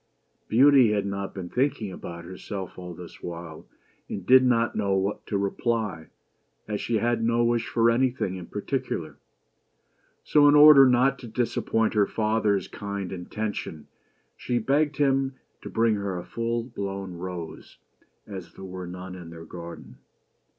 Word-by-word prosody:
Beauty 130 -2 +6
had 100 -1 0
not 100 0 -3
been 95 -2 -5
thinking 125 -6 0
about 85 -2 -8
herself 95 +1 -7
all 90 -1 -8
this 90 0 -11
while, 85 -2 -8 0.4
and 95 - -5
did 130 +3 +7
not 120 -2 +2
know 100 -2 +1
what 95 +2 -2
to 100 - -1
reply, 100 -4 -2 0.6
as 105 -1 -3
she 120 - -1
had 115 +1 0
no 115 +1 +2
wish 120 -1 +1
for 115 0 +3
anything 120 -6 0
in 90 -2 -8
particular; - - -4 1.1
so, 145 -1 +5
in 145 - +6
order 145 -2 +9
not 125 +2 +3
to 120 - -9
disappoint 115 -1 0
her 105 -2 +3
father's 105 -3 0
kind 100 -2 -5
intention, 95 -3 -5 0.5
she 120 - -2
begged 140 +5 +1
him 135 -2 +1 0.3
to - - -8
bring 115 0 +2
her 100 -3 -2
a 90 - -6
full 115 0 -2
blown 100 -5 -5
rose, 85 -2 -7 0.5
as 95 -4 -9
there 95 - -10
were 90 -1 -7
none 90 +1 -8
in 90 -2 -9
their 80 0 -10
garden. 85 -1 -10
105 Hz, 155 wpm, -26 LUFS, 95-120 Hz, 1.1 s, order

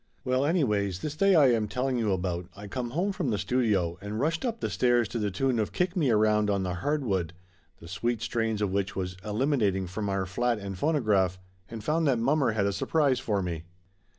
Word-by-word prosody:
Well 130 +2 +1
anyways, 105 - +1
this 150 -1 -4
day 195 +3 +4
I 140 -6 +6
am 110 -3 +1
telling 125 +4 -1
you 110 -3 +1
about, 90 -2 -2
I 100 +1 -9
come 120 +4 -4
home 175 +10 0
from 185 -8 -2
the 105 - 0
studio, 100 -9 0
and 105 +2 -4
rushed 160 +5 0
up 230 -3 -2
the - - -2
stairs 120 -2 +2
to 120 - -3
the 105 -1 0
tune 120 +5 0
of 105 - -2
Kick 180 +1 0
Me 155 -8 +2
Around 105 -1 +3
on 100 -1 +1
the 90 -1 -2
Hardwood, 95 - -1 0.5
the 85 - -12
sweet 115 +6 -2
strains 110 -2 -1
of 100 - 0
which 100 0 -1
was 90 -1 -3
eliminating 105 -4 +1
from 100 +3 -4
our 95 -1 -1
flat 120 +6 0
and 100 -1 -6
phonograph, 105 - +1 0.3
and 115 -2 -7
found 160 +1 +1
that 130 -3 +3
mommer 130 0 +2
had 105 -2 +1
a 100 - 0
sur 100 - -3
prise 145 -6 +2
for 105 -7 -1
me. 85 -2 -4
110 Hz, 220 wpm, -28 LUFS, 100-135 Hz, 0.5 s, I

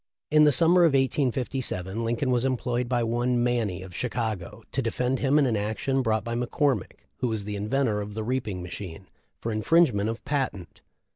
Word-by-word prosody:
In 150 0 +6
the 150 - +6
summer 170 +6 +5
of 165 -4 +4
1857 125 - 0
Lincoln 120 +3 0
was 120 -1 +2
employed 125 -2 -1
by 120 -2 +1
one 120 +1 +1
Manny, 110 -7 0
of 90 -2 -11
Chicago, 110 -3 -3
to 135 - 0
defend 125 +2 -1
him 140 +1 +3
in 145 - +4
an 120 -4 +1
action 110 +6 -1
brought 110 -3 0
by 115 - -4
McCormick,*who 125 - -1
was 110 -3 -2
the 105 0 -4
inventor 105 +1 0
of 105 0 -7
the 110 - -3
reaping 110 -6 -2
machine, 90 0 -7 0.3
for 115 - -3
infringement 110 -2 +3
of 115 - -6
patent. 130 - -3
120 Hz, 180 wpm, -26 LUFS, 105-130 Hz, 0.3 s, In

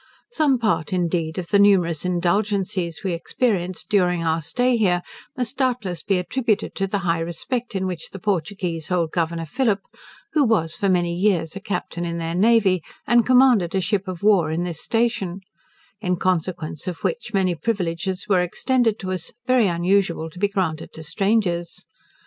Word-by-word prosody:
Some 300 - +2
part, 215 -9 0
indeed, 170 -3 -1
of 175 -2 -4
the 200 - +4
numerous 180 -6 +4
indulgencies 180 -1 0
we 190 -3 -1
experienced 180 -1 -1
during 180 -5 +2
our 165 0 +1
stay 245 +10 +1
here, 180 -6 +2 0.3
must 250 -3 -3
doubtless 235 -10 -1
be 195 +1 +1
attributed 220 +4 -1
to 195 - -1
the 200 - -1
high 165 -1 +1
respect 210 +8 -3
in 190 0 0
which 180 -3 -4
the - - -8
Portuguese 175 -3 -2
held 170 -3 0
Governor 165 -1 -1
Phillip, 210 - 0 0.5
who 300 - +4
was 185 - +1
for 200 - 0
many 175 -2 +2
years 180 -3 +1
a - - -4
captain 180 -3 -4
in 170 0 -3
their 165 0 -3
navy, 195 -2 +4 0.2
and 240 0 +4
commanded 250 -9 +5
a - - +3
ship 195 +1 -1
of 185 0 -6
war 190 -7 +4
on 165 +2 -1
this 170 -3 -5
station: 225 -6 -1 0.6
in 180 -4 0
consequence 175 -3 -2
of 175 -3 -5
which, 480 - -2
many 190 -3 +2
privileges 180 -1 -2
were 190 -3 +3
extended 225 +5 +1
to 185 -3 -5
us, 180 -3 -4
very 255 -4 +4
unusual 175 -2 +1
to 180 - -12
be 205 - +3
granted 185 -6 -2
to 160 - -9
strangers. 175 0 -1
185 Hz, 170 wpm, -22 LUFS, 170-210 Hz, 0.6 s, commanded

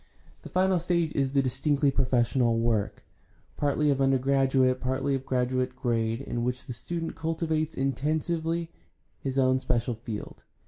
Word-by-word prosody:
The - - -10
final 185 0 +2
stage 170 -2 0
is 135 -1 0
the 140 -1 +3
distinctly 140 +2 +1
professional 120 -2 +2
work, 115 -3 0 0.5
partly 145 +1 +1
of 135 -1 0
undergraduate, 135 -1 +3
partly 130 +2 -1
of 135 -1 -3
graduate 130 0 0
grade, 115 -1 -1
in 120 -3 -3
which 125 +1 -2
the 125 - -5
student 165 +7 -4
cultivates 160 -1 -2
intensively 160 +5 -1 0.5
his 135 -1 -3
own 130 -1 +3
special 120 -1 0
field. 115 -1 -7
135 Hz, 140 wpm, -28 LUFS, 125-155 Hz, 0.5 s, the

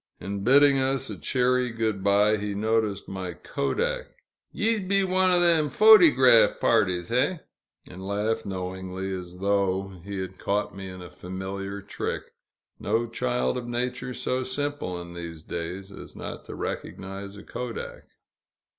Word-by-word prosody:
In 100 +1 -4
bidding 140 +3 +6
us 135 0 0
a - - -4
cheery 125 -1 +1
good 110 -4 -2
bye, 105 +2 +4
he 105 -1 -3
noticed 110 -1 0
my 95 -2 -5
kodak. - - -2 0.4
"Yees 225 0 +1
be 195 +1 +1
one 185 0 +2
o' 180 -1 +4
them 165 -4 +4
photygraph 155 - +7
parties, 90 -2 +2
hey?" 140 +8 +1 0.5
and 95 +1 -10
laughed 105 +3 -1
knowingly, 95 0 -4
as 90 -1 -7
though 95 0 +1
he 100 +1 -5
had 95 0 -5
caught 100 0 -1
me 95 0 -6
in 90 -1 -9
a 90 - -11
familiar 95 +2 -6
trick. 100 - -4 0.6
No 115 +3 0
child 125 +2 -1
of 120 - -8
nature 125 +1 -3
so 130 0 -1
simple, 130 -7 -3
in 85 0 -9
these 85 -2 -7
days, 90 +4 -5
as - - -11
not - - -7
to - - -8
recognize 100 +1 -6
a - - -10
kodak. 125 -2 -6
105 Hz, 150 wpm, -26 LUFS, 95-130 Hz, 0.6 s, photygraph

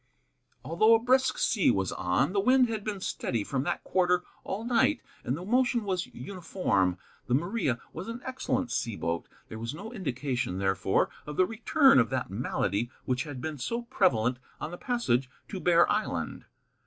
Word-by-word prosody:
Although 215 +8 +5
a - - +3
brisk 260 +3 +3
sea 205 -5 +3
was 95 -2 +1
on, 95 - 0
the 200 - +2
wind 255 +4 +5
had 220 -2 -3
been 205 -3 -4
steady 115 - -2
from 130 +4 -1
that - - -2
quarter 180 -1 +2 0.2
all 205 +4 -4
night, 245 +5 +3 0.2
and 130 - -1
the 180 - -7
motion 245 +1 +2
was 185 -3 -1
uniform. 165 - -1 0.3
The 125 - +3
Maria 170 - 0
was 185 - -6
an 230 +1 -5
excellent 260 0 -2
sea 115 -3 -1
boat. 85 -3 -2 0.2
There 110 - -8
was 115 +5 -4
no 215 +8 -8
indication, 130 - -2
therefore, 95 0 +1 0.2
of 150 - -6
the 185 - +5
return 240 - +4
of 115 - +3
that 130 -7 -2
malady 105 0 -1 0.2
which 130 +2 0
had 145 -4 -7
been 155 -1 -4
so 235 - -2
prevalent 125 - +2 0.2
on - - -4
the 175 - -6
passage 135 - 0 0.2
to 195 - -5
Bear 175 -1 +5
Island. 210 +1 -2
175 Hz, 180 wpm, -29 LUFS, -, 0.3 s, Although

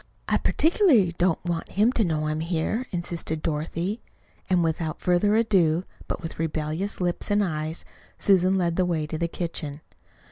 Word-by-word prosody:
I - - +3
particularly 305 - +3
don't 175 -1 +1
want 170 -1 -3
him 215 +5 +4
to 235 - +1
know 155 -4 0
I 155 - 0
am 155 - -2
here," 170 +9 -1
insisted 170 -3 -3
Dorothy. 165 +7 -2 0.5
And 180 -2 +3
without 160 -1 -2
further 180 +4 +2
ado, 185 -7 +3 0.2
but - - -4
with 165 - -6
rebellious 160 +4 -2
lips 175 +2 -2
and 205 0 +3
eyes, 155 -2 -3 0.3
Susan 190 -1 +3
led 170 -2 0
the 185 - +3
way 160 -3 0
to 155 +1 -5
the 170 - +1
kitchen. 160 -4 -5
170 Hz, 170 wpm, -25 LUFS, 160-190 Hz, 0.5 s, him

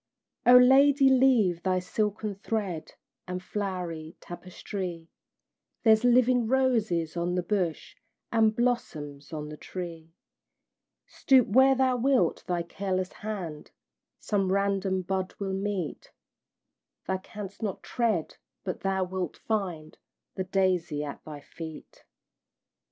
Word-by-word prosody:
O 250 0 +10
Lady, 270 +2 +6
leave 245 -10 +4
thy 185 0 +1
silken 210 +3 -2
thread 195 -5 -4 0.3
And 180 0 -3
flowery 180 -5 -4
tapestrie: 175 -1 -7 0.7
There's 220 0 +5
living 245 -1 +4
roses 225 -11 +1
on 175 +1 -1
the 180 - 0
bush, 175 -4 -2 0.4
And 220 -1 +3
blossoms 155 - -2
on 150 -1 -5
the 150 - -8
tree; 165 -2 -8 0.9
Stoop 260 -4 +3
where 265 +5 +6
thou 260 -1 +2
wilt, 245 -8 +2
thy 175 -1 0
careless 185 +1 -3
hand 185 -8 -6 0.5
Some 195 -3 0
random 195 -1 +1
bud 190 0 -2
will 195 -1 -3
meet; 195 -4 -3 0.9
Thou 190 0 -1
canst 200 +1 -9
not 205 -4 -3
tread, 220 -9 -1 0.3
but 185 -2 -4
thou 190 -1 0
wilt 185 -2 -4
find 180 -8 -3 0.3
The 190 - -3
daisy 180 -5 0
at 145 - -7
thy 150 -2 -8
feet. 160 +1 -10
190 Hz, 120 wpm, -28 LUFS, 175-220 Hz, 0.9 s, O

